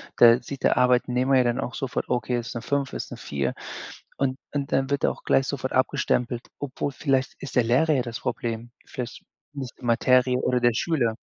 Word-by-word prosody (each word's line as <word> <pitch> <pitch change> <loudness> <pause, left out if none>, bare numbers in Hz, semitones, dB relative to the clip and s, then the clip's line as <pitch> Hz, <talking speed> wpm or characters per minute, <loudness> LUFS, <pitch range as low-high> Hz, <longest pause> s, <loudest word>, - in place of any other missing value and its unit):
da 120 +1 +7
sieht 140 -2 -8
der - - +3
Arbeitnehmer 125 +1 +3
ja 130 - +5
dann 120 +2 0
auch 130 - -3
sofort: 135 -2 -3
„Okay, 120 0 0
ist 115 +1 -7
'ne 115 - -3
5, 140 +2 -1
ist - - -5
'ne - - -6
4,“, 70 -2 -2 0.6
und 130 -1 0 0.2
und 140 -1 -2
dann 135 0 +1
wird 140 0 +1
auch - - -2
gleich 135 - +3
sofort 130 -2 -3
abgestempelt, 125 -2 0
obwohl 140 0 -3
vielleicht 135 -2 0
ist 135 -2 -5
der 120 - +4
Lehrer 150 +7 +3
ja 130 - +2
das 120 -2 -6
Problem, 115 0 -3
vielleicht 125 -1 -6 0.3
nicht 135 -3 -6
die 125 - -9
Materie 125 +1 +3
oder 125 -1 +1
der 120 -1 +4
Schüler. 120 -5 0
125 Hz, 200 wpm, -25 LUFS, 120-135 Hz, 0.6 s, da